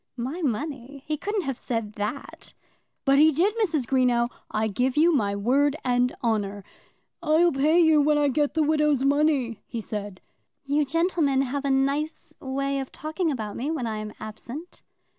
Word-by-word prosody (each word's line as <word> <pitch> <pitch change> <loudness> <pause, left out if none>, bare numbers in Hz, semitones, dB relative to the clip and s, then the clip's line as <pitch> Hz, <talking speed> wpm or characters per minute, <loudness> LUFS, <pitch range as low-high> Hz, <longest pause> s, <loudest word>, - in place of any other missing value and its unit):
"My 265 +9 -4
money! 275 0 -3
He 310 - -1
couldn't 410 +5 -2
have 270 -4 -4
said 225 -3 -3
that!" 210 +7 -6 0.5
"But 275 0 +5
he 310 +1 +7
did, 355 +8 +2
Mrs. 325 - 0
Greenow; 245 -2 +2 0.2
I 215 +1 0
give 250 +6 -1
you 335 +3 +5
my 205 -8 +1
word 270 +8 +2
and 250 0 +2
honour. 205 -3 -1 0.6
'I'll 335 +1 +4
pay 300 +5 +3
you 320 -3 +5
when 300 +1 +3
I 295 -1 +3
get 290 +2 0
the 315 - +3
widow's 300 -3 +2
money,' 280 -6 +1
he 235 - -5
said." 205 -3 -6 0.5
"You 290 +2 +1
gentlemen 320 -3 +1
must 260 -2 -2
have 285 0 -2
a - - +1
nice 275 +4 -1
way 275 +1 -2
of 270 - -6
talking 315 +3 -2
about 220 -8 -4
me 270 +5 -3
when 310 -6 -2
I 220 -1 -3
am 215 0 -5
absent." 240 +10 -9
275 Hz, 180 wpm, -25 LUFS, 240-305 Hz, 0.6 s, he